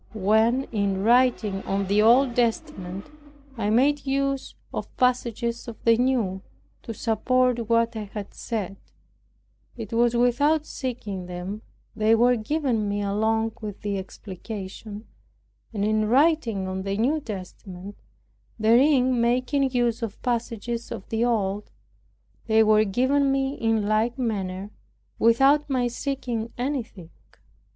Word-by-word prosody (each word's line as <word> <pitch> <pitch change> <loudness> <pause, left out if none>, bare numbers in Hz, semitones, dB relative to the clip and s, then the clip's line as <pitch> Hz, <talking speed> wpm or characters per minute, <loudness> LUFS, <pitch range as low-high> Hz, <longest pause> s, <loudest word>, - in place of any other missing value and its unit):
When, 220 +5 +3
in 200 -3 0
writing 230 -4 +3
on 195 0 -1
the 200 +2 +2
Old 240 +3 +5
Testament, 225 - -2 0.5
I 210 -3 -1
made 275 +5 +2
use 275 0 -1 0.2
of - - -6
passages 240 -2 0
of 230 - -7
the 230 -1 +5
New, 230 -6 0 0.4
to - - -7
support 235 +1 +1
what 230 0 +2
I 215 -1 -4
had 205 0 -8
said, 200 -4 -4 1.0
it 225 -2 -7
was 235 +1 +3
without 285 +6 +2
seeking 225 -11 -5
them, 180 +4 -6 0.3
they 220 +1 +4
were 245 +2 +4
given 235 -3 -1
me 205 0 -1
along 220 +2 0
with 210 -2 -7
the 200 -1 -2
explication; 205 +2 -8 0.7
and 205 -3 -1
in 215 0 +1
writing 250 - +2
on 190 0 -3
the 195 +1 -3
New 270 +8 +1
Testament, 195 -4 -8 0.6
therein 250 +2 +4
making 255 +3 +1
use 240 -2 0
of 225 -3 -5
passages 235 -1 -3
of 215 -5 -7
the 225 +1 0
Old, 210 -3 -1 0.8
they 220 0 +5
were 215 0 +4
given 265 +7 +2
me 270 0 0
in 225 -5 0
like 220 +4 +1
manner 200 -5 -3 0.5
without 270 +6 +4
my 255 -2 +1
seeking 240 -3 -3
anything. 240 - -4
230 Hz, 130 wpm, -25 LUFS, 205-250 Hz, 1.0 s, Old